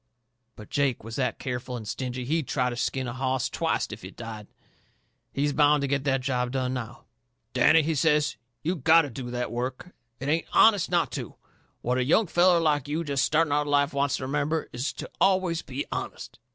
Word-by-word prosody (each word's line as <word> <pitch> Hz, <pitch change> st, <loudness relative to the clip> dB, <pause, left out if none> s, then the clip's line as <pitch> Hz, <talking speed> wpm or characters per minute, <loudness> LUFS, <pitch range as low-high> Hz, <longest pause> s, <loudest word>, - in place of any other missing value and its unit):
But 105 Hz, -, -12 dB
Jake 140 Hz, -6 st, 0 dB
was 115 Hz, +1 st, -7 dB
that -, -, 0 dB
careful 125 Hz, -1 st, -4 dB
and 110 Hz, -3 st, -8 dB
stingy 125 Hz, +2 st, -4 dB
he'd 155 Hz, +2 st, -1 dB
try 125 Hz, -2 st, 0 dB
to -, -, -4 dB
skin 130 Hz, +1 st, -2 dB
a 120 Hz, -, -4 dB
hoss 130 Hz, 0 st, -1 dB
twicet 165 Hz, -8 st, -1 dB
if 110 Hz, -, -10 dB
it 95 Hz, -, -9 dB
died. 110 Hz, -3 st, -8 dB, 0.8 s
He's 145 Hz, +1 st, 0 dB
bound 150 Hz, 0 st, +4 dB
to 140 Hz, -, 0 dB
get 140 Hz, 0 st, -1 dB
that 135 Hz, -2 st, +1 dB
job 125 Hz, -2 st, -1 dB
done, 130 Hz, -1 st, -1 dB
now. 120 Hz, -4 st, -6 dB, 0.5 s
"Danny," 155 Hz, +5 st, +5 dB
he 160 Hz, +2 st, 0 dB
says, 150 Hz, 0 st, +2 dB, 0.3 s
"you 175 Hz, +4 st, 0 dB
gotto 160 Hz, 0 st, +4 dB
do 120 Hz, +1 st, -6 dB
that 125 Hz, 0 st, -3 dB
work. 130 Hz, +8 st, -4 dB, 0.3 s
It 135 Hz, -, -5 dB
ain't 160 Hz, +3 st, 0 dB
HONEST 205 Hz, -5 st, +5 dB
not 170 Hz, -6 st, +1 dB
to. -, -, -6 dB, 0.5 s
What 125 Hz, +2 st, +1 dB
a -, -, +2 dB
young 165 Hz, -, +3 dB
feller 175 Hz, 0 st, +4 dB
like 150 Hz, -4 st, +1 dB
you 155 Hz, +3 st, -1 dB
jest 140 Hz, -3 st, 0 dB
starting 155 Hz, 0 st, +2 dB
out 145 Hz, -, +3 dB
into 145 Hz, -, -4 dB
life 145 Hz, +1 st, +2 dB
wants 140 Hz, 0 st, +1 dB
to -, -, -6 dB
remember 150 Hz, +4 st, -1 dB
is 125 Hz, +4 st, -2 dB
to -, -, -7 dB
always 185 Hz, -3 st, +2 dB
be 135 Hz, +2 st, -5 dB
honest. -, -, -6 dB
140 Hz, 205 wpm, -26 LUFS, 125-155 Hz, 0.8 s, Danny